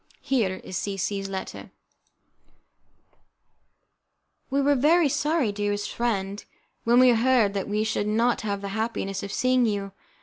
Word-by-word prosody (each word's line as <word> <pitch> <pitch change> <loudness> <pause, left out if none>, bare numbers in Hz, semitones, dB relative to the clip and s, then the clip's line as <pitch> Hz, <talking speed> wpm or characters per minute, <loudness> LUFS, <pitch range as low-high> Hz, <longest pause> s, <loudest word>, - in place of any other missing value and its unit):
Here 220 -9 0
is 185 - -5
C 200 0 -3
C 195 +1 -2
's 195 - -6
letter" 190 -1 -6 2.8
"We 275 +1 0
were 285 +1 +3
very 305 +5 +4
sorry, 295 -3 0
dearest 205 0 -2
friend, 205 -4 -2 0.4
when 240 +2 +5
we 255 0 +7
heard 235 -3 +3
that 200 0 -3
we 210 +1 0
should 220 -1 -1
not 230 +3 +1
have 200 -2 -3
the 200 - -5
happiness 200 -2 -3
of 200 - -6
seeing 255 0 +2
you. 200 -2 -2
215 Hz, 145 wpm, -25 LUFS, 200-255 Hz, 2.8 s, we